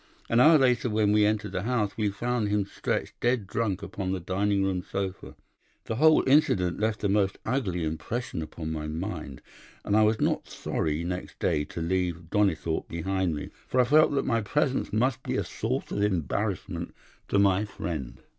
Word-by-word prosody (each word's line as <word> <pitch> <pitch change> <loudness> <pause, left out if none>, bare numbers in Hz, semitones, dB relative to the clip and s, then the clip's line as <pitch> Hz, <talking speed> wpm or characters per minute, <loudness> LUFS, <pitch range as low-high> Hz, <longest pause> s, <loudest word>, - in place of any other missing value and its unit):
An 115 - +3
hour 155 +5 +8
later, 125 -3 +2
when 105 -1 +2
we 105 0 +4
entered 105 -2 -1
the 95 -1 -2
house, 110 -2 -1
we 105 -2 0
found 115 +1 -1
him 105 -1 +1
stretched - - -3
dead 120 -3 +1
drunk 100 -1 -2
upon 95 -2 -4
the 95 - -1
dining 100 +3 0
room 95 -2 0
sofa. 95 0 -5 0.5
The 115 - -3
whole 155 +1 +5
incident 105 - +3
left 110 0 -1
a - - +3
most 100 -1 +1
ugly 105 -9 -1
impression 80 +7 -3
upon 80 0 -6
my 75 -1 -4
mind, 80 -4 -5 0.4
and 100 - +1
I 110 - +5
was 110 +1 +3
not - - 0
sorry 80 +1 -2
next 90 +1 -5
day 75 - 0
to 85 - -5
leave 85 -2 -2
Donnithorpe 90 -6 +1
behind 90 0 -1
me, 75 - -6 0.2
for 130 - 0
I - - +7
felt 150 +5 +5
that 140 - 0
my 115 -1 +1
presence 135 +5 0
must 130 +4 +1
be - - -2
a - - 0
source - - -3
of 100 - -1
embarrassment 95 - -2 0.3
to - - +1
my 100 0 +4
friend. 80 - -5
100 Hz, 185 wpm, -27 LUFS, 90-110 Hz, 0.5 s, hour